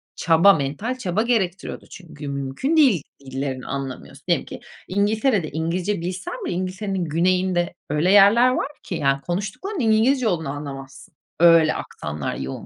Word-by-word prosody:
çaba, 170 +4 +5
mental 160 - -3
çaba 195 -4 -1
gerektiriyordu 195 -7 -2
çünkü 155 -5 -10
mümkün 140 - -2
değil 245 - +4 0.2
dillerini 135 -1 -5
anlamıyorsun. 135 -2 -6
Diyelim - - +1
ki - - -9 0.3
İngiltere'de 205 - +1
İngilizce 170 +5 -2
bilsen 180 +2 -5
bile - - -2
İngiltere'nin 185 +1 -3
güneyinde 175 +2 +1 0.2
öyle 150 +5 +2
yerler 205 +5 +6
var 255 - -1 0.2
ki, 180 - -5
yani, 140 -3 +1
konuştuklarının 200 - -4
İngilizce 230 +2 +3
olduğunu 160 -7 -1
anlamazsın. 135 -1 -8 0.3
Öyle 165 -2 +6
aksanlar 75 -1 -5
yoğun 65 0 -6
175 Hz, 140 wpm, -22 LUFS, 145-205 Hz, 0.3 s, yerler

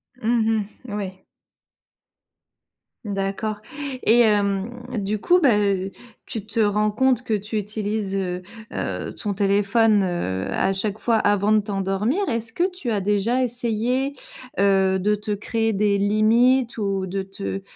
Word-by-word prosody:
Mmh 225 -3 +1 0.2
mh. 205 - -6
Oui. 190 -2 -5 1.8
D'accord 200 +2 -2 0.5
et 235 +2 +5
hem, 210 +2 +1 0.2
du 205 +1 -1
coup, 360 - +4
bah, 250 -10 +4
heu, 195 -1 0 0.3
tu 215 -2 -6
te 225 +2 -4
rends 210 0 +2
compte 255 +2 +2
que 225 - -2
tu 210 +2 -3
utilises, 210 -1 -2
heu 180 -2 -2 0.3
heu, - - -3
ton 205 -2 -3
téléphone, 205 +1 +3
heu, 95 - -2
à 195 - +1
chaque 205 +2 -2
fois 230 -2 +1
avant 205 0 +2
de 215 - +5
t'endormir. 205 - -1
Est-ce 230 -2 -2
que 355 +9 +1
tu 325 -10 -5
as 205 - +1
déjà 210 +6 +1
essayé, 245 +3 -1 0.5
heu, 190 -1 +3
de 210 +3 +2
te 210 +1 -5
créer 225 +2 0
des 200 0 +2
limites 230 +5 +3
ou 195 -2 -1
de 195 +1 -3
te 195 0 -5
210 Hz, 145 wpm, -23 LUFS, 195-230 Hz, 1.8 s, et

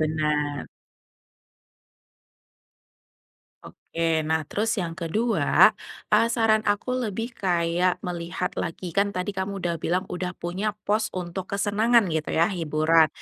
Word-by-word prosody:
benar. 150 -2 0 3.0
Oke. 165 -1 -2
Nah 160 0 0
terus 225 +8 -1
yang 175 -4 -2
kedua, 210 +9 +3 0.4
eee, 230 +2 +5
saran 225 -2 +3
aku 205 +5 0
lebih 225 +1 -3
kayak 175 -1 +1
melihat 175 0 -3
lagi, 170 +1 -4
kan 200 +2 +2
tadi 200 +1 -3
kamu 195 +1 -3 0.2
bilang 180 +4 0
udah 180 0 -4
punya 195 +5 -3
pos 215 +1 +1
untuk 180 +1 -5
kesenangan 210 +4 +3
gitu 160 -1 -2
ya, 165 - +5
hiburan. 160 -1 +3
180 Hz, 115 wpm, -25 LUFS, 165-205 Hz, 3.0 s, eee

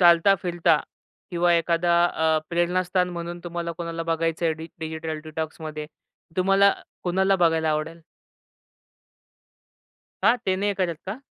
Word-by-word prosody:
चालता 175 +2 +6
फिरता 170 -3 +2 0.5
किंवा 175 0 +2
एखादा 170 +1 +2
अ, 160 -2 +1
प्रेरणास्थान 180 +1 +1
म्हणून 175 0 -5
तुम्हाला 170 -1 -3
कोणाला 165 -1 -4
बघायचं 165 0 -1
आहे 160 - +2
डि 160 +1 -8
डिजिटल 160 0 -4
डिटॉक्समध्ये? 155 -1 -5 0.5
तुम्हाला 195 +2 +5 0.3
कोणाला 190 +2 +2
बघायला 165 -2 +2
आवडेल? 155 +2 -2 2.2
का? 240 - +5
ते 190 -6 -1
नाही 205 +1 0
करत 175 -5 -1
का? 215 +8 -5
170 Hz, 120 wpm, -25 LUFS, 160-180 Hz, 2.2 s, चालता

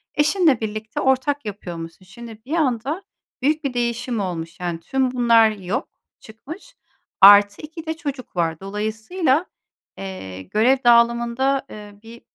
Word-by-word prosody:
eşinle 300 - +3
birlikte 215 0 -4
ortak 265 0 +1
yapıyormuşsun. 175 -3 -8
Şimdi 225 +3 -12
bir 295 - -5
anda 285 - -1 0.4
büyük 305 +4 +1
bir 275 -3 -2
değişim 240 0 -2
olmuş. 175 -3 -5
Yani 175 -2 -3
tüm 260 +7 -1
bunlar 235 -3 +4
yok 205 - -4 0.3
çıkmış, 320 - -12 0.5
artı 205 +1 +8
2 315 +1 -9
de 320 - -2
çocuk 280 - -6
var. 165 -2 -1
Dolayısıyla, 220 - -1 0.5
eee, 140 - -7
görev 225 - +2
dağılımında, 235 +3 +3
eee, 205 -1 -11
bir, 230 +1 -13
235 Hz, 130 wpm, -21 LUFS, 205-270 Hz, 0.5 s, artı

